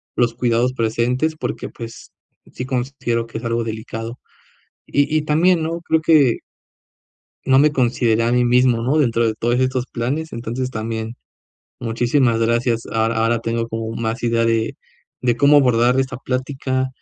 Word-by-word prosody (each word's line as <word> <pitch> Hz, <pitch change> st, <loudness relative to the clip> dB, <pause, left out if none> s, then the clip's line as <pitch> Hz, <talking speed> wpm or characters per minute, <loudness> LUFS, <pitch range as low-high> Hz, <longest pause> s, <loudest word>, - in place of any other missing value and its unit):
los 120 Hz, -1 st, +2 dB
cuidados 120 Hz, +1 st, +1 dB
presentes 125 Hz, +6 st, 0 dB
porque, -, -, -4 dB
pues, 115 Hz, -1 st, -10 dB, 0.4 s
sí -, -, -5 dB
considero 125 Hz, -2 st, -2 dB
que 115 Hz, -1 st, -6 dB
es 120 Hz, -, -13 dB
algo 115 Hz, 0 st, -1 dB
delicado 115 Hz, +1 st, -6 dB, 0.7 s
y 145 Hz, +2 st, +1 dB
y 155 Hz, -, +2 dB
también 165 Hz, +3 st, +3 dB
no 165 Hz, +1 st, -3 dB
creo 160 Hz, -1 st, +1 dB
que 150 Hz, -7 st, +4 dB, 1.1 s
no 130 Hz, 0 st, +4 dB
me 150 Hz, +1 st, +4 dB
consideré 120 Hz, -3 st, +1 dB
a 120 Hz, -, +1 dB
mí 125 Hz, 0 st, +3 dB
mismo, 125 Hz, -1 st, +3 dB
no, 140 Hz, +6 st, +1 dB
dentro 115 Hz, -4 st, +2 dB
de 110 Hz, -, 0 dB
todos 120 Hz, +2 st, 0 dB
estos 130 Hz, -1 st, 0 dB
planes, 140 Hz, +7 st, -3 dB
entonces 120 Hz, +2 st, -4 dB
también. 110 Hz, 0 st, -4 dB, 0.6 s
Muchísimas 120 Hz, +1 st, +1 dB
gracias, 115 Hz, 0 st, +1 dB
ahora 115 Hz, 0 st, +1 dB
ahora 115 Hz, +1 st, +1 dB
tengo 115 Hz, 0 st, -2 dB
como 115 Hz, 0 st, -4 dB
más 115 Hz, +1 st, -3 dB
idea 115 Hz, -1 st, +1 dB
de 115 Hz, -1 st, 0 dB, 0.4 s
de 120 Hz, -2 st, +1 dB
cómo 145 Hz, +3 st, +5 dB
abordar 125 Hz, 0 st, +3 dB
esta 130 Hz, -1 st, -3 dB
plática, 130 Hz, 0 st, -2 dB
120 Hz, 160 wpm, -20 LUFS, 115-130 Hz, 1.1 s, cómo